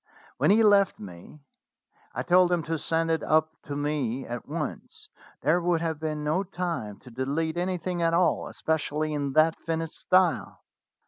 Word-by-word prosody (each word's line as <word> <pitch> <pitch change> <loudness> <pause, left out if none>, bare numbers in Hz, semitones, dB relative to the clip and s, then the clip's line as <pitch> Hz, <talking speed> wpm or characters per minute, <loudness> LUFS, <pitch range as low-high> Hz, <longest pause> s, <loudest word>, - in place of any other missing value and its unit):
When - - +2
he 220 +3 +5
left 200 -2 +4
me 95 - -11 0.7
I - - -2
told 180 0 +4
him 175 -2 +1
to 160 0 -2
send 165 +1 0
it 160 - +1
up 155 0 +2
to 145 - -5
me 140 -4 -2
at 120 0 -6
once: - - -6 0.4
there 160 +6 +3
would 175 -1 +1
have 160 -2 -2
been 155 -1 -3
no 155 +5 +1
time 175 - -4
to 125 - -13
delete 145 +6 -2
any 180 +1 -1
thing 175 +1 -3
at 165 0 +3
all, 170 -7 +2
especially 155 -1 -2
in 140 -2 -2
that 155 +2 +3
finished 165 0 -3
style." 185 -2 +1
160 Hz, 175 wpm, -27 LUFS, 150-175 Hz, 0.7 s, he